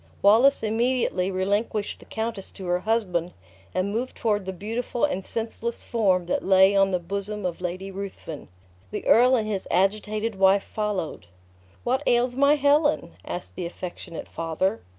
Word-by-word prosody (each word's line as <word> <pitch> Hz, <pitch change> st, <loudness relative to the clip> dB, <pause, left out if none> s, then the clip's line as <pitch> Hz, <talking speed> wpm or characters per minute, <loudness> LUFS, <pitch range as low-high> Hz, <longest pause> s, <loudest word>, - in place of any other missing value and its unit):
Wallace 230 Hz, +8 st, +5 dB
immediately 225 Hz, -4 st, +1 dB
relinquished 200 Hz, +3 st, -1 dB
the -, -, -15 dB
countess 220 Hz, -3 st, -4 dB
to 190 Hz, -, -8 dB
her 180 Hz, 0 st, +1 dB
husband, 180 Hz, -5 st, 0 dB, 0.4 s
and 185 Hz, +2 st, -1 dB
moved 240 Hz, +4 st, -3 dB
toward 210 Hz, -4 st, 0 dB
the -, -, -1 dB
beautiful 225 Hz, +6 st, -2 dB
and 195 Hz, -10 st, -2 dB
senseless 230 Hz, +2 st, -4 dB
form 190 Hz, -6 st, +2 dB
that 175 Hz, -, 0 dB
lay 190 Hz, +1 st, +5 dB
on 195 Hz, 0 st, +4 dB
the 185 Hz, -, +1 dB
bosom 200 Hz, +3 st, -4 dB
of 180 Hz, -1 st, -3 dB
Lady 185 Hz, +2 st, -4 dB
Ruthven. 190 Hz, -6 st, -7 dB, 0.4 s
The -, -, -5 dB
earl 250 Hz, +3 st, +6 dB
and 220 Hz, -3 st, 0 dB
his 200 Hz, -3 st, -3 dB
agitated 210 Hz, +3 st, 0 dB
wife 195 Hz, +1 st, +5 dB
followed. 205 Hz, -, -3 dB, 0.6 s
"What 255 Hz, +3 st, +1 dB
ails 245 Hz, +1 st, +3 dB
my 280 Hz, +2 st, +5 dB
Helen?" 290 Hz, -, +2 dB
asked 175 Hz, -, -6 dB
the 180 Hz, -1 st, -4 dB
affectionate 175 Hz, -1 st, -7 dB
father. 175 Hz, +6 st, -1 dB
200 Hz, 155 wpm, -25 LUFS, 185-230 Hz, 0.6 s, earl